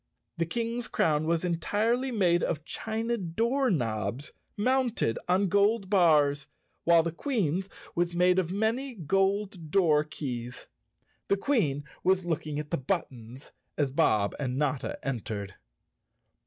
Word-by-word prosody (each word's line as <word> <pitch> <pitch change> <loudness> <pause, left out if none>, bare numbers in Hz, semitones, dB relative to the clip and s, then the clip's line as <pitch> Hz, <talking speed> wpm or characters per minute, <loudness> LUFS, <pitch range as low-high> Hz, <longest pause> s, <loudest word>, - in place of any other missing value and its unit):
The 165 - +1
King's 235 +4 -2
crown 155 0 +1
was 170 +1 +1
entirely 220 +9 0
made 180 -7 +2
of 155 -1 -2
china 225 +4 -2
door 230 +9 0
knobs, 115 - -2 0.3
mounted 245 - +1
on 190 +2 +3
gold 200 +1 +2
bars, 150 -7 +4 0.4
while 170 -1 +6
the 170 - -2
Queen's 190 - -1 0.2
was 175 0 0
made 180 +1 +4
of 175 -3 -1
many 230 +6 -1
gold 195 0 0
door 155 -4 +4
keys. 125 -5 -6 0.6
The 200 - +2
Queen 195 - +1 0.2
was 185 0 +2
looking 155 -3 -2
at 150 0 -5
the 170 - +1
buttons 130 - -4 0.3
as 140 -3 +1
Bob 110 -9 +2
and 130 -3 -2
Notta 140 -2 -1
entered. 105 -6 -4
170 Hz, 130 wpm, -28 LUFS, 145-205 Hz, 0.6 s, while